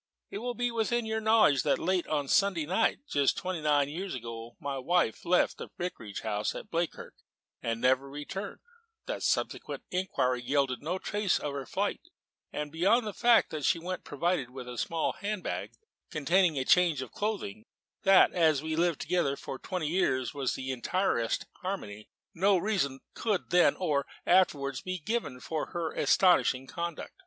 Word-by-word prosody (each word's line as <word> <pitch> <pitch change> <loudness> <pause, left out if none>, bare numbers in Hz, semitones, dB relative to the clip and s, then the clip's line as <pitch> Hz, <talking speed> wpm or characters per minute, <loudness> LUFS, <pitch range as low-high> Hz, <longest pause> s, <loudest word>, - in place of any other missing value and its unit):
It 200 - -4
will 245 +2 -3
be 245 0 0
within 230 +1 0
your 220 0 -1
knowledge 220 - +5
that 145 - +2
late 185 0 0
on 150 -2 0
a - - -14
Sunday 190 -2 +2
night, 190 - +1
just 140 - +2
twenty 185 -4 -3
nine 145 -2 +3
years 175 +3 -4
ago, 115 -1 -7
my 140 -2 -3
wife 170 -3 +1
left 180 +1 +2
the - - -7
Vicarage 115 - -5
house, 105 -1 -1 0.2
Bleakirk, 170 0 -2 0.5
and 115 0 -2
never 130 +2 +2
returned; 150 +8 -6 0.4
that - - -4
subsequent - - -1
inquiry 130 -9 0
yielded 135 0 0
no 170 +5 -2
trace 205 0 0
of 145 - -4
her 140 -2 -5
flight, 200 +1 -1 0.7
beyond 200 +9 +3
the 210 - -4
fact 240 +2 +4
that 155 -2 -4
she 170 - +3
went 180 +2 -5
provided 145 -3 -1
with 125 -1 -9
a 120 -2 -6
small 165 -1 0
hand 205 -2 -4
bag - - -4 0.4
containing 165 +1 +2
a 130 - 0
change 170 -6 +4
of 130 - -11
clothing; 210 0 -3 0.4
that, 195 -2 +6
as 155 -5 +3
we 160 - -4
had 155 - 0
lived 170 -3 +1
together 170 -5 +1
for 135 - -7
twenty 185 -4 -3
years 135 -7 +1
in 140 -2 -4
the 130 0 -4
entirest 130 - 0 0.2
harmony, 110 - -5 0.2
no 190 +3 +3
reason 170 -9 -1
could 210 -5 -1
then, 180 0 +5
or 150 -6 0 0.2
afterwards, 140 -7 +3
be 185 0 -3
given 195 - -3
for 155 +4 -3
her 165 -2 -3
astonishing 155 -8 +3
conduct. 170 +2 -5
165 Hz, 170 wpm, -30 LUFS, 135-190 Hz, 0.7 s, that